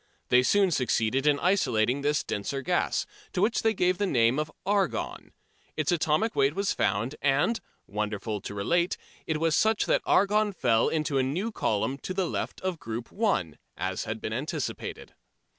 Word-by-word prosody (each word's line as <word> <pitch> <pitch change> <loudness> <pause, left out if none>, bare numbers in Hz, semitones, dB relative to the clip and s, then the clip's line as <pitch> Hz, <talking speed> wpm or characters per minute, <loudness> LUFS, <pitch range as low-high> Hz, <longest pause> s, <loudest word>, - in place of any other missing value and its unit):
They 125 - +6
soon 195 +8 +3
succeeded 130 -1 +1
in 145 -1 +4
isolating 130 - +2
this 145 +1 +1
denser 135 +7 -3
gas, - - 0 0.3
to 180 - 0
which 225 +2 +2
they 220 -1 +2
gave 180 -1 +1
the 205 - +1
name 120 -3 +3
of 150 0 -2
argon. 200 0 -1 0.5
Its - - +1
atomic 175 +6 +1
weight 140 +2 +2
was 200 0 0
found, 115 +6 0
and, 145 +12 +2 0.3
wonderful 105 0 -3
to 100 - -7
relate, 170 - +1 0.3
it 160 - 0
was 160 0 +1
such 220 0 +3
that - - +2
argon 210 +1 +3
fell 115 -9 +2
into 155 -3 0
a - - +3
new 175 - -2
column 130 - -1
to 185 - -5
the 190 -1 +1
left - - -3
of 185 -3 -2
Group 115 +1 -6
1, 190 - 0 0.2
as - - -2
had - - -4
been - - -4
anticipated. - - -4
150 Hz, 175 wpm, -28 LUFS, 120-190 Hz, 0.5 s, They